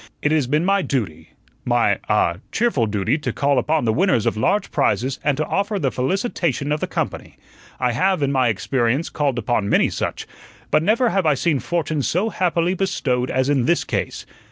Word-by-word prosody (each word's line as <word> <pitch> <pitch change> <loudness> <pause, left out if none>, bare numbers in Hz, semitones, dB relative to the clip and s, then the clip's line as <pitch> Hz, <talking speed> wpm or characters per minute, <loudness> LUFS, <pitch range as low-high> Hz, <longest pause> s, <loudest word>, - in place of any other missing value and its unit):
It 150 - +2
has 155 -5 +2
been 150 +5 +1
my 195 +1 +3
duty, 115 - -3 0.3
my - - +2
ah 85 0 +2
cheerful 225 - +1
duty 105 +8 0
to - - -3
call 140 -2 +1
upon 155 +1 0
the 110 - +2
winners 170 - +2
of - - +1
large 195 - 0
prizes 130 +6 0
and 145 -2 +1
to 155 - 0
offer 200 +4 -1
the 140 -8 0
felicitation 150 - -1
of 150 - 0
the - - -2
company. - - -4 0.4
I 125 -1 +1
have, 155 +6 +1
in 140 - +1
my 130 -2 +2
experience, 120 - 0
called 140 -4 -1
upon 120 -5 0
many - - +3
such; - - -3 0.5
but - - +4
never 230 +8 +2
have 195 -5 +1
I 150 - +4
seen 150 0 0
fortune 155 -2 -2
so 185 +10 0
happily 175 -1 0
bestowed 140 -10 -1
as 130 0 0
in 140 -4 +2
this 170 - +2
case. - - -3
145 Hz, 195 wpm, -21 LUFS, 125-175 Hz, 0.5 s, but